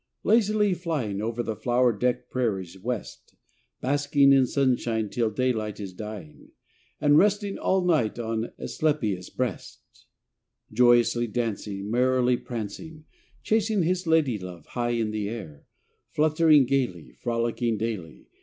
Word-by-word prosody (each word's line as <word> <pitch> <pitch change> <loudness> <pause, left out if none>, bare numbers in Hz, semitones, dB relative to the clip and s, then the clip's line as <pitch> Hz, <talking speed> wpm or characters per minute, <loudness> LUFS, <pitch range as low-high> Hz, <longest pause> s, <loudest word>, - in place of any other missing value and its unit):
Lazily 210 -2 +3
flying 150 - -3
Over 115 +2 -2
the 110 -1 -3
flower 120 +1 +2
decked 125 +2 -1
prairies, 95 -8 -2
West; 120 +2 -6 0.5
Basking 140 0 +3
in 135 -2 +4
sunshine 120 -5 0
till 115 +1 0
daylight 110 -2 -1
is 100 -3 -6
dying, 105 -6 -9 0.5
And 145 +1 +5
resting 205 0 +1
all 190 -1 +1
night 150 -13 +1
on 115 -1 -3
Asclepias' 110 - -1
breast; - - -4 0.9
Joyously 120 0 +4
dancing, 105 -3 -3
Merrily 125 0 +2
prancing, 125 +9 -7 0.4
Chasing 215 -3 +1
his 180 +1 -1
lady 150 -9 +2
love 90 -3 -9
high 120 -1 -2
in 110 -2 -1
the 105 -1 -3
air, 90 -11 -8 0.4
Fluttering 155 -2 +4
gaily, 120 - -1
Frolicking 115 - -1
daily. 105 -7 -5
120 Hz, 125 wpm, -26 LUFS, 110-145 Hz, 0.9 s, And